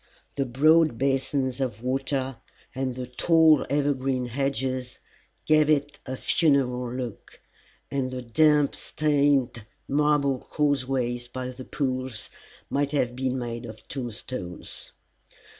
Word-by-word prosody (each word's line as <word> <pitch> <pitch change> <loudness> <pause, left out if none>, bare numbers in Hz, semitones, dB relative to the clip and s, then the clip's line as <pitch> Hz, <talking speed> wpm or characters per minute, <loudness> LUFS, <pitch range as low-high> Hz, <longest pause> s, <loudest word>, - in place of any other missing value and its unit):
The 135 -1 -1
broad 155 +2 +4
basins 135 0 0
of 120 -4 -3
water 135 0 -1 0.4
and 130 -1 -2
the 130 0 -4
tall 160 +4 +4
evergreen 135 -3 0
hedges 130 0 -2 0.5
gave 155 -1 +4
it 145 -1 +1
a 130 0 -4
funereal 125 -7 +2
look, 125 -3 -6 0.5
and 135 -2 -1
the 130 -1 -5
damp 150 +4 +4
stained 140 -6 +1 0.2
marble 145 -2 +2
causeways 130 -5 -1
by 125 +1 -5
the 130 0 -9
pools 130 -5 -2 0.4
might 140 +1 -1
have 125 -4 +1
been 130 0 -1
made 120 -1 -4
of 110 -2 -10
tombstones. 120 -7 -5
130 Hz, 115 wpm, -26 LUFS, 125-145 Hz, 0.5 s, broad